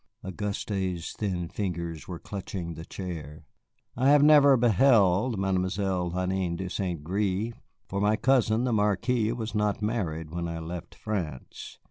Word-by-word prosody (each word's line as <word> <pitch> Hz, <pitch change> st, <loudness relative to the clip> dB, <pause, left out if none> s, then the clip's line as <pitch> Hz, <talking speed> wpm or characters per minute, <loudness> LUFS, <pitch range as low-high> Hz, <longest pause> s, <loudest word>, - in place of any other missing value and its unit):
Auguste's 95 Hz, -2 st, -3 dB
thin 90 Hz, -5 st, -2 dB
fingers 85 Hz, -4 st, -4 dB
were 90 Hz, -, -5 dB
clutching 90 Hz, -2 st, -6 dB
the 80 Hz, +1 st, -8 dB
chair. 80 Hz, -6 st, -7 dB, 0.5 s
"I 130 Hz, +3 st, +3 dB
have 145 Hz, 0 st, +6 dB
never 145 Hz, -3 st, +7 dB
beheld 115 Hz, -2 st, +4 dB
Mademoiselle 95 Hz, -1 st, 0 dB
Hélène 90 Hz, -1 st, -1 dB
de 95 Hz, 0 st, -5 dB
St. 90 Hz, -6 st, -3 dB
Gré, 100 Hz, +5 st, -1 dB, 0.3 s
for 100 Hz, +1 st, -3 dB
my 105 Hz, +1 st, +3 dB
cousin, 120 Hz, -2 st, +2 dB
the 125 Hz, -2 st, +1 dB
Marquis, 110 Hz, +2 st, +1 dB
was 115 Hz, -2 st, -4 dB
not 105 Hz, -1 st, 0 dB
married 80 Hz, -8 st, -2 dB
when 85 Hz, 0 st, -3 dB
I 85 Hz, 0 st, -4 dB
left 85 Hz, +1 st, -7 dB
France. 85 Hz, -11 st, -5 dB
95 Hz, 140 wpm, -27 LUFS, 85-110 Hz, 0.5 s, never